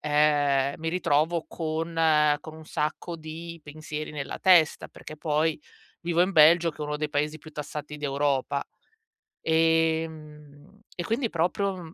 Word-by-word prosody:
ehm, 145 -2 +2
mi 160 - -3
ritrovo 160 -1 +1
con 160 0 -3 0.5
con 160 0 -10
un 160 0 -12
sacco 155 +3 -3
di 165 +1 -8
pensieri 155 0 -7
nella 140 -2 -5
testa, 175 -5 +4
perché 155 - -11
poi 155 0 0 0.4
vivo 170 0 +2
in 185 - +1
Belgio 165 +1 +6
che 155 - -20
è - - -4
uno 150 0 -2
dei 150 0 -2
paesi 150 +2 -1
più 155 - -13
tassati 150 0 -6
d'Europa, 140 -1 -1 0.8
ehm, 160 0 -1 0.2
e 175 - -3
quindi 230 +5 -1
proprio 180 0 -1
155 Hz, 140 wpm, -26 LUFS, 150-165 Hz, 0.8 s, Belgio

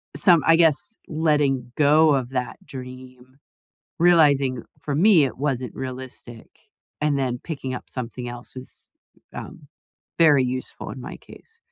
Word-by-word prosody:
some 175 -6 +4
I 165 - +6
guess, 165 +6 +2
letting 145 -6 +1
go 150 +1 +5
of 130 -2 -2
that 125 -2 -3
dream, 130 -2 -11 0.6
realizing, 145 -7 +4 0.2
for 140 -1 -3
me, 180 -3 +5
it 130 - -5
wasn't 130 -4 -2
realistic, 130 -3 -7 0.5
and 150 -2 +1
then 125 -2 -1
picking 135 -5 -5
up - - -7
something 125 -1 -6
else, 120 +1 -8
was, 130 0 -8 0.4
um, - - -9 0.5
very 150 -5 +5
useful, 130 +1 -4
in 130 - -7
my 135 - -8
case. 450 0 -16
135 Hz, 140 wpm, -23 LUFS, 125-150 Hz, 0.6 s, I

